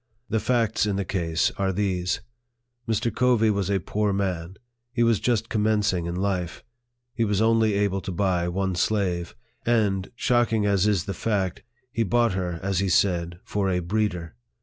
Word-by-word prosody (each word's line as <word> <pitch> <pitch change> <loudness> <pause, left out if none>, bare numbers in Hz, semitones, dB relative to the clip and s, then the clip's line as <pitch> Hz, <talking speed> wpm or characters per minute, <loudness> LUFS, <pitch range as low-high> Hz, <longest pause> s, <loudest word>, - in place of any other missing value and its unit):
The 110 - +2
facts 115 -3 +1
in 100 - 0
the 100 0 -1
case 85 -3 0
are 95 -1 +1
these: 95 -2 -1 0.7
Mr. 115 +1 0
Covey 120 -3 +3
was 100 -2 -1
a 100 -1 +2
poor 105 +4 -1
man; 95 -3 -2 0.4
he 120 -1 +1
was 115 -3 +3
just 115 -3 0
commencing 105 -6 +1
in 85 - -3
life; 90 -2 -2 0.5
he 115 - 0
was 105 -3 +1
only 110 -1 +3
able 100 -1 +1
to 95 - -5
buy 90 -1 0
one 95 +1 -1
slave; 90 -2 0 0.3
and, 105 -5 +1
shocking 120 -3 +2
as 100 -1 +2
is 100 -4 +1
the 100 - -3
fact, 95 -2 -1 0.3
he 115 - -1
bought 115 0 +2
her, 90 -2 -2
as 95 -2 0
he 100 -1 0
said, 85 -1 +1
for 100 -2 -1
a 90 - +1
breeder. 90 -2 -1
100 Hz, 170 wpm, -25 LUFS, 90-110 Hz, 0.7 s, Covey